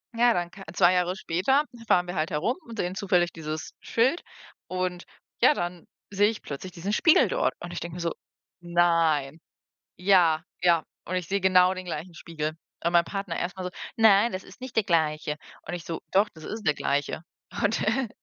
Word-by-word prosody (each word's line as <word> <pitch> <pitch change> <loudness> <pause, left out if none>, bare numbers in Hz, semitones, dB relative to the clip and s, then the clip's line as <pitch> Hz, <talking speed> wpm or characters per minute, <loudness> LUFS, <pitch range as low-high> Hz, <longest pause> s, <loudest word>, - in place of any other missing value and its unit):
Ja, 240 +1 +5
dann 175 -3 -1
ka 195 +2 -12
2 180 -1 +5
Jahre 180 0 +1
später 195 - +1 0.2
fahren 180 -4 +3
wir 175 - -5
halt 155 -1 -1
herum 175 +12 0
und 230 -1 -9
sehen 180 +1 -1
zufällig 180 -4 +2
dieses 155 -1 -6
Schild 260 +9 +1 0.4
und 185 -1 -2 0.4
ja, - - +7
dann 175 - -4 0.3
sehe 205 +1 +4
ich 225 - -5
plötzlich 150 +6 -7
diesen 185 +3 -4
Spiegel 330 - +5
dort - - 0
und 175 - -7
ich 175 - -3
denke 170 0 -6
mir 175 - -5
so: 170 -1 -1 0.5
„Nein.“ 165 -4 +2 0.6
Ja, 180 -4 +4 0.2
ja 170 -3 +4 0.2
und 185 - -3
ich 180 -2 -2
sehe 200 +4 0
genau 185 0 +5
den 185 0 -7
gleichen 170 0 -6
Spiegel. 155 -1 -4 0.3
Und 170 +1 0
mein 170 0 +5
Partner 195 -2 -4
erst 175 +2 -3
mal 185 - -5
so: 180 - -3 0.3
„Nein, 220 0 +6
das 185 -2 -5
ist - - -15
nicht 255 -1 -8
der 220 - +3
gleiche,“ 155 -4 +1 0.3
und 170 - -4
ich 175 -2 -6
so: 165 -1 -4
„Doch, 200 +3 +4
das 160 -1 -13
ist 220 0 -5
der 150 -4 +3
gleiche.“ 145 +2 -1 0.4
Und 205 +2 +2
e 230 +3 +1
180 Hz, 200 wpm, -26 LUFS, 165-200 Hz, 0.6 s, ja